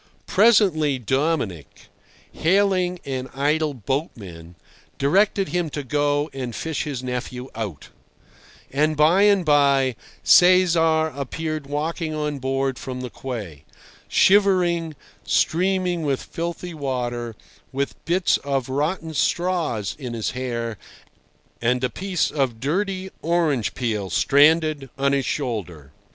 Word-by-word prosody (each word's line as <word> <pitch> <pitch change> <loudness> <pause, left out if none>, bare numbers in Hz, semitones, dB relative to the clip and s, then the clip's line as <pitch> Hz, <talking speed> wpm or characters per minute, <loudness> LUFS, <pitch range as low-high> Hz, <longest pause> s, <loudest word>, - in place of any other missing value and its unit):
Presently 190 - +4
Dominic, 130 - -2 0.4
hailing 185 0 +1
an 130 -1 -4
idle 150 +1 0
boatman, 100 - -5 0.4
directed 195 +6 +2
him 175 -2 -1
to 145 0 -5
go 145 +2 0
and 125 -3 -5
fish 160 -3 -3
his 135 -4 -4
nephew 125 0 -5
out; 105 -10 -6 0.8
and 150 +2 +1
by 160 +6 +5
and 200 -3 +4
by 140 -4 +3 0.3
Cesar 165 -3 +5
appeared 155 +2 -4
walking 155 +2 -3
on 150 -2 -2
board 135 0 -1
from 130 -1 -6
the 125 -2 -6
quay, 105 - -7 0.4
shivering, 180 -5 +3 0.3
streaming 180 0 +1
with 140 -4 -1
filthy 170 +1 -5
water, 120 -5 -3 0.4
with 140 +1 -4
bits 180 +2 +2
of 135 -3 -2
rotten 160 +4 -2
straws 160 - 0
in 125 -3 -5
his 110 - -2
hair 115 -4 -4 0.8
and 125 +2 +1
a 125 - 0
piece 185 -4 -1
of 130 -6 -1
dirty 190 - -2
orange 160 -8 0
peel 110 -6 -2
stranded 150 - +3
on 140 0 +1
his 135 -2 0
shoulder. 90 - -4
145 Hz, 115 wpm, -23 LUFS, 125-170 Hz, 0.8 s, by